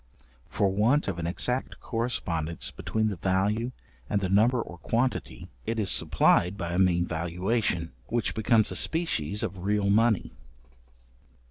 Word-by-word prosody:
For 100 - +1
want 120 +9 +2
of 85 - -3
an 85 - -2
exact 125 +9 -2
correspondence 85 -9 -2
between 110 0 -2
the 100 - -5
value 100 +7 0 0.4
and 105 - +1
the 95 -2 -2
number 115 +6 +3
or 90 -6 -6
quantity, 120 +8 -2 0.2
it 115 - -1
is 105 -3 +2
supplied 90 +4 +3
by 85 -2 -3
a 90 - 0
mean 90 -2 +3
valuation, 90 +2 -1 0.2
which 120 -1 -1
becomes 110 0 +2
a - - -3
species 105 - 0
of 95 0 -4
real 100 0 +1
money. 110 -1 +2
100 Hz, 145 wpm, -27 LUFS, 90-115 Hz, 0.4 s, number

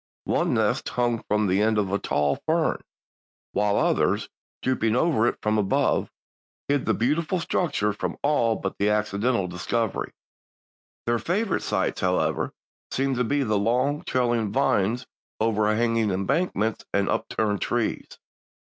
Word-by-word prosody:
One - - +1
nest - - +1
hung 120 -2 0
from 105 0 +2
the 95 +1 +2
end 110 0 +2
of 100 -3 0
a 100 - +1
tall 75 -1 0
fern, 160 0 +1 0.7
while 105 -1 +1
others, - - +1 0.3
drooping 115 -4 +1
over 125 -5 +3
it - - 0
from 110 0 +2
above, 100 -2 +1 0.6
hid 145 -1 0
the - - +3
beautiful 155 +9 0
structure 155 - 0
from 105 - -4
all 120 -6 +2
but 95 -1 -5
accidental 105 +1 +1
discovery. 95 +4 -2 0.9
Their 120 0 +1
favorite 195 - 0
sites, 95 -3 -1
however, 90 0 0 0.4
seemed 135 -1 0
to 125 - +2
be 140 +4 +1
the 105 -4 +1
long, 125 +7 +1
trailing 120 -4 0
vines 120 -1 +1 0.3
overhanging 110 +1 +2
embankments 110 - 0
and 100 0 +1
upturned 105 -2 -1
trees. 120 -2 -1
115 Hz, 135 wpm, -25 LUFS, 105-130 Hz, 0.9 s, over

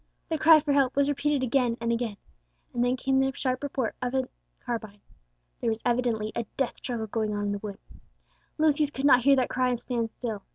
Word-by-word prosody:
the 320 - 0
cry 320 0 +8
for 295 -1 0
help, 275 -2 +2
was 280 0 +3
repeated 285 -1 0
again 245 -2 +1
and 235 0 -1
again, 230 -3 -2 0.6
and 240 - +1
then 250 +1 +1
came 265 +1 +1
the 270 0 +2
sharp 255 -1 -1
report 265 -5 -2
of 250 +1 -2
a 260 -1 0 0.4
carbine. 220 -4 -4 0.6
There 235 - 0
was 220 - 0
evidently 235 -3 0
a 235 -2 -2
death 270 -3 -1
struggle 235 -3 -4
going 215 -1 -2
on 205 0 -2
in 205 - -1
the 205 - -2
wood. 200 -1 -7 0.8
Lucius 305 -1 +3
could 275 -1 -4
not 255 -3 +6
hear 275 0 +6
that 255 -2 +1
cry 255 0 +1
and 245 -2 -1
stand 235 -3 -2
still. 220 -3 -5
250 Hz, 215 wpm, -27 LUFS, 230-275 Hz, 0.8 s, cry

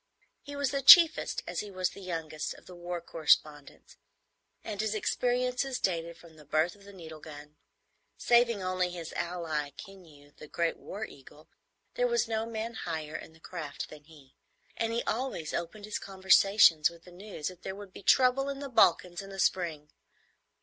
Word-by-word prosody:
He 285 0 -9
was 285 -2 -1
the 275 - -1
chiefest, 335 +2 +7
as - - -4
he 210 - -5
was 185 -2 -2
the 200 - -12
youngest, 165 -4 -4
of - - -17
the 180 - -12
war 175 0 -5
correspondents, 155 -3 0 0.7
and 210 -2 -4
his 220 0 -1
experiences 250 +4 0
dated 170 -2 -2
from 165 -2 -17
the 150 - -14
birth 155 +4 0
of 200 -1 -19
the 200 - -12
needle 160 -5 -11
gun. 150 -1 -12 0.6
Saving 235 -4 +3
only 185 -1 0
his 170 -2 -7
ally, 165 -4 -3
Keneu 160 -7 -14
the 155 - -11
Great 170 +2 -1
War 210 +3 -6
Eagle, 145 0 -16 0.4
there - - +1
was 475 - +1
no 225 0 -2
man 230 0 -4
higher 160 -7 -5
in 160 - -8
the 160 - -20
craft 160 -4 -7
than 150 -1 -13
he, 145 -4 -18 0.4
and 225 0 -1
he 235 +1 -1
always 225 -9 -3
opened 175 +5 -4
his 215 - -4
conversation 190 -3 +4
with 170 0 -16
the 180 - -15
news 185 -4 -6
that 180 -1 -14
there 190 - -6
would 200 -2 -11
be - - -10
trouble 260 +6 +3
in 280 - -4
the 280 0 -6
Balkans 180 -6 +3
in 195 - -11
the 195 0 -9
spring. 165 -5 -1
185 Hz, 185 wpm, -30 LUFS, 160-220 Hz, 0.7 s, chiefest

